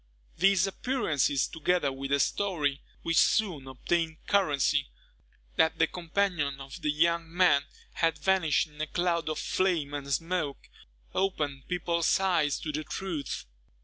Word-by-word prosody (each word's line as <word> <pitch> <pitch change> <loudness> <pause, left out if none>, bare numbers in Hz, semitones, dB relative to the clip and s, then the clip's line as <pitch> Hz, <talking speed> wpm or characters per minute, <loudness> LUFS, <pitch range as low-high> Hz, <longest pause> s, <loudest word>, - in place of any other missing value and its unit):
These 195 0 +4
appearances, 165 - 0
together 160 -2 0
with 135 +1 -6
a 140 - +3
story, 150 -7 0 0.2
which 165 0 0
soon 175 -11 +2
obtained 160 +5 -1
currency, 150 -7 +2 0.7
that 160 - +3
the 165 - +4
companion 170 -5 -1
of 135 0 -9
the 150 - 0
young 165 +2 +1
man 170 -5 +4 0.3
had 165 -1 +1
vanished 185 -6 +2
in 150 -1 -10
a 155 - -1
cloud 170 -2 0
of 155 - -2
flame 170 -7 0
and 140 -1 -5
smoke, 165 -1 -2 0.4
opened 150 -8 -1
people's 170 -1 +1
eyes 170 -7 +1
to 155 - -3
the 155 +1 -3
truth. 165 -2 -4
160 Hz, 140 wpm, -29 LUFS, 145-180 Hz, 0.7 s, These